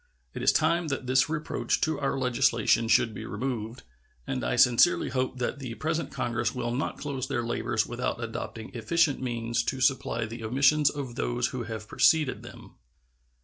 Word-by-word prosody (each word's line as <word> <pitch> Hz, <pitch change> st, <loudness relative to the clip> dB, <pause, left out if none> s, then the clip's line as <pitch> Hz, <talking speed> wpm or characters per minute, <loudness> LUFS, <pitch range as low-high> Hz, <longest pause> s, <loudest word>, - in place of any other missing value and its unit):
It -, -, -6 dB
is -, -, +5 dB
time 170 Hz, 0 st, +2 dB
that 135 Hz, -3 st, -3 dB
this 130 Hz, +1 st, +3 dB
reproach 155 Hz, -1 st, -1 dB
to 155 Hz, -2 st, 0 dB
our 135 Hz, -1 st, -1 dB
legislation 120 Hz, -3 st, +2 dB
should 115 Hz, 0 st, +3 dB
be -, -, -7 dB
removed, 120 Hz, -2 st, -4 dB, 0.4 s
and -, -, -3 dB
I -, -, 0 dB
sincerely 125 Hz, +8 st, +4 dB
hope 130 Hz, 0 st, -2 dB
that 125 Hz, +3 st, -2 dB
the 125 Hz, -4 st, -6 dB
present 160 Hz, +3 st, -2 dB
Congress 120 Hz, -3 st, -2 dB
will 120 Hz, -1 st, -2 dB
not 135 Hz, -, -2 dB
close 140 Hz, -3 st, -4 dB
their 120 Hz, -, -1 dB
labors 115 Hz, -1 st, 0 dB
without 120 Hz, +1 st, -3 dB
adopting 115 Hz, -1 st, -6 dB
efficient 135 Hz, +6 st, +1 dB
means 120 Hz, -2 st, -1 dB
to 130 Hz, -, -2 dB
supply 130 Hz, -3 st, +1 dB
the 115 Hz, +1 st, -8 dB
omissions 140 Hz, +5 st, +3 dB
of 140 Hz, -5 st, -5 dB
those 120 Hz, 0 st, -1 dB
who 125 Hz, -3 st, -5 dB
have 110 Hz, -1 st, -6 dB
preceded 155 Hz, +1 st, +3 dB
them. -, -, -13 dB
125 Hz, 175 wpm, -27 LUFS, 115-140 Hz, 0.4 s, is